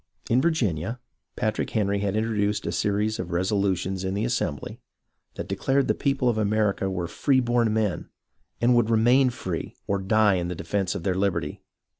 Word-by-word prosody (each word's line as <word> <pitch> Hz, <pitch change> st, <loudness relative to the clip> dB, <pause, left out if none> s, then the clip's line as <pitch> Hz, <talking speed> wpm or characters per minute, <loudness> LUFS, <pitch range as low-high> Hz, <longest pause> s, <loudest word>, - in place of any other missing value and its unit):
In 125 Hz, +3 st, +4 dB
Virginia, 115 Hz, -, 0 dB, 0.4 s
Patrick 110 Hz, 0 st, -1 dB
Henry 100 Hz, -2 st, 0 dB
had 100 Hz, 0 st, -1 dB
introduced 105 Hz, -1 st, 0 dB
a 85 Hz, -, -1 dB
series 105 Hz, +4 st, 0 dB
of -, -, -4 dB
resolutions 95 Hz, 0 st, 0 dB
in 95 Hz, +1 st, -2 dB
the 105 Hz, +2 st, 0 dB
Assembly, 90 Hz, -, -2 dB, 0.6 s
that -, -, -5 dB
declared 135 Hz, 0 st, +1 dB
the -, -, +3 dB
people 135 Hz, -2 st, 0 dB
of 115 Hz, -3 st, +2 dB
America 105 Hz, -2 st, +1 dB
were 90 Hz, -2 st, -2 dB
free 130 Hz, -, +2 dB
born 120 Hz, -2 st, +2 dB
men 110 Hz, -4 st, -1 dB, 0.5 s
and 120 Hz, +1 st, +4 dB
would 120 Hz, -2 st, +3 dB
remain 120 Hz, +4 st, +4 dB
free, 90 Hz, -8 st, -5 dB
or 100 Hz, 0 st, 0 dB
die 105 Hz, 0 st, +3 dB
in 85 Hz, -1 st, -2 dB
the 90 Hz, -, -4 dB
defence 95 Hz, +2 st, -2 dB
of 95 Hz, -, -5 dB
their 95 Hz, -, +1 dB
Hberty. 95 Hz, 0 st, -1 dB
105 Hz, 175 wpm, -25 LUFS, 95-115 Hz, 0.6 s, In